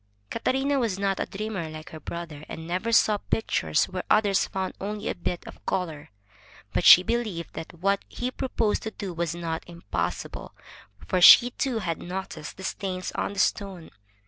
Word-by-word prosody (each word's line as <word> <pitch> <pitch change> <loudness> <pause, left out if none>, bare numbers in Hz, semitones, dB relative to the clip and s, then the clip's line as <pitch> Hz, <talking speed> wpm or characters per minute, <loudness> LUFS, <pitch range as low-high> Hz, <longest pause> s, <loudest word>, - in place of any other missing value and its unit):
Catarina 270 +4 +1
was 225 -6 0
not 195 -1 0
a - - -1
dreamer 195 -5 -4
like 155 0 -9
her 160 - -8
brother, 160 -1 -7
and 160 - -7
never 185 +7 -2
saw 215 -2 +4
pictures 80 - +1
where 185 0 -4
others 205 -2 +3
found 190 -1 -3
only 210 +2 -4
a - - 0
bit 175 0 -4
of - - -12
color, 160 -6 -2 0.6
but - - +1
she 180 - +10
believed 215 -7 -2
that 160 - -7
what 195 +4 0
he 250 +1 -3
proposed 235 -5 -1
to 220 - -4
do 200 -4 -6
was 170 -1 -2
not 165 -1 -3
impossible, 170 -11 -4 0.5
for 185 - 0
she 245 +7 +10
too 255 -1 -1
had 170 -7 -3
noticed 180 -4 -6
the 190 - -9
stains 185 -2 -3
on - - -2
the - - -11
stone. 195 -5 -1
190 Hz, 175 wpm, -26 LUFS, 170-215 Hz, 0.6 s, she